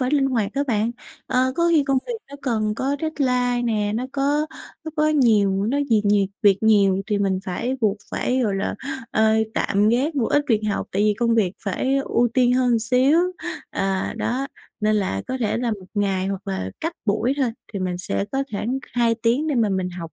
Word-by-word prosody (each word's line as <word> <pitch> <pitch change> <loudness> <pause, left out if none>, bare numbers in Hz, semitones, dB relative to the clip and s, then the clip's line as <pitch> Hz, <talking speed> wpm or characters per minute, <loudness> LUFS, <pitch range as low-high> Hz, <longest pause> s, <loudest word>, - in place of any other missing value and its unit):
phải 255 +1 0
linh 280 -2 +3
hoạt 230 -6 0
á 280 - +1
bạn. 220 -1 +1 0.4
Ờ, 260 +1 +1
có 340 0 +3
khi 310 -4 +4
công 270 -1 +2
việc - - -3 0.2
nó 285 - -8
cần 215 -5 0
có 275 +4 -1
deadline 250 -6 0
nè, 210 -3 0
nó 245 +3 -2
có 290 +2 +1 0.4
nó 320 - -4
có 305 0 +3
nhiều 230 -10 +4
những 195 +3 0
có 280 - +1
nhiệt 215 -3 +3
nhiều 205 -1 +3 0.2
việc 200 -2 +5
nhiều 200 -3 +4
thì 210 -3 0
mình 200 - +1
mình 185 - -1
phải 240 +8 -2
buộc 210 -2 +2
phải, 255 +1 0
gọi 205 -4 0
là, 195 - -2 0.4
ơ, 220 0 +3 0.2
tạm 205 +2 +2
gác 265 +8 +1
một 255 -6 +1
ít 290 0 +2
việc 220 -2 +3
học 200 - -2
tại 200 - +1
vì 210 0 +3
công 235 -1 +2
việc 200 -6 +2
phải 260 +7 0
ưu 240 0 +2
tiên 250 -2 +4
hơn 250 -2 +3
xíu. 255 +7 +3 0.5
À, 195 -1 -1
đó, 260 +3 -1 0.3
nên 215 0 +2
là 145 - -1
có 260 - -2
thể 220 -2 0
là 240 0 -1
một 195 -4 -6
ngày, 195 -2 0
hoặc 195 +1 -4
là 190 - -3
cách 330 +1 -2
buổi 225 +4 +1
thôi 265 -4 +1 0.2
thì 200 - -3
mình 180 -1 -2
sẽ 195 +1 -2
có 270 0 +1
khoảng 235 +6 -2
2 235 -1 +2
tiếng 235 +6 +1
để 290 - 0
mà 225 -3 +2
mình 190 -2 -1
học 170 -2 -8
230 Hz, 225 wpm, -22 LUFS, 200-260 Hz, 0.5 s, việc